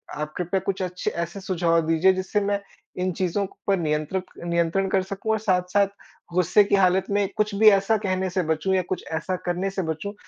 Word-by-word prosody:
आप 150 +1 -4
कृपया 180 +2 0
कुछ 195 -1 -1
अच्छे 180 0 -3
ऐसे 170 +3 -4
सुझाव 170 -3 +1
दीजिए, 165 +3 +4
जिससे 185 +3 -1
मैं 200 0 0 0.4
इन 185 0 0
चीज़ों 190 +3 -1 0.2
पर 195 -1 +3
नियंत्रित 155 +3 -1 0.2
नियंत्रण 170 +3 +1
कर 190 - +2
सकूँ। 200 +3 -3
और 220 - +1
साथ-साथ 190 0 +2 0.5
गुस्से 180 +3 +4
की 200 - +2
हालत 190 -1 +3
में 200 -1 +2
कुछ 210 -1 +1
भी 215 +2 +7
ऐसा 200 +2 +3
कहने 190 -2 -1
से 180 0 -1
बचूँ 160 +4 0
या 185 - +3
कुछ 185 - -2
ऐसा 165 +3 -2
करने 180 +2 -1
से 195 0 -3
बचूँ 160 +5 -4
185 Hz, 200 wpm, -24 LUFS, 170-200 Hz, 0.5 s, भी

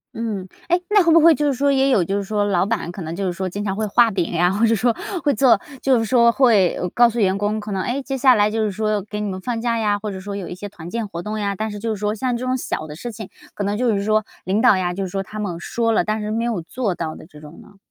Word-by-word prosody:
嗯。 215 -5 -4 0.2
诶， 350 +1 +3
那 415 -2 +5
会 335 - +3
不 335 - +7
会 330 0 +6
就 295 - -1
是 280 - +2
说 280 +2 +1
也 270 0 +3
有 215 -9 +3
就 195 +4 -1
是 200 - -2
说 205 +1 -1
老 190 -3 +1
板 210 -5 -2
可 185 - -8
能 165 0 -5
就 195 +2 -3
是 180 - -1
说 185 +1 -3
经 205 +3 -5
常 195 -1 -1
会 215 +1 -1
画 230 +3 +4
饼 185 -4 -1
呀， 175 +1 +3
或 205 +4 +2
者 230 - +3
说 230 +2 +1 0.3
会 285 - +3
做 235 -2 +4 0.2
就 260 -3 +3
是 225 - -1
说 235 0 +4
会， 225 -9 +3
呃， 180 - -2
告 240 +5 +4
诉 235 +1 -4
员 195 -2 +2
工， 205 +2 -1
可 210 0 -7
能， 190 -1 -1
诶， 260 +3 -2
接 270 0 -4
下 260 0 +6
来 210 0 +3
就 220 +1 -1
是 210 - 0
说 215 +1 -1
给 210 +1 -6
你 210 -1 -2
们 185 -1 -5
放 235 +2 -3
假 235 -1 0
呀， 210 -2 +1
或 210 +1 -4
者 190 - -6
说 200 +1 -6
有 195 -3 -5
一 180 - -6
些 205 +3 -7
团 175 -5 -10
建 230 +1 -3
活 170 -3 -6
动 215 +3 -4
呀。 200 -1 -1
但 220 +2 -2
是 205 - -6
就 225 +2 -3
是 210 - -7
说 210 +1 -1
像 250 +2 -1
这 250 - -5
种 255 0 0
小 155 -9 -4
的 150 - -8
事 240 +9 -6
情， 215 -3 -9 0.2
可 205 - -4
能 205 +1 -1
就 240 -1 +1
是 200 - -1
说 215 0 +1 0.2
领 195 +4 +1
导 200 - +5
呀， 180 -1 -1
就 195 +2 -3
是 190 - -4
说 195 +2 -2
他 210 - -10
们 180 -5 -3
说 230 +6 -1
了， 220 - +2
但 215 0 -2
是 210 0 -3
没 225 +1 -1
有 225 -7 -1
做 200 +3 -3
到 160 -2 -4
的 - - -12
这 150 - -15
种 150 +1 -12
呢。 - - -18
210 Hz, 350 characters per minute, -21 LUFS, 190-235 Hz, 0.3 s, 不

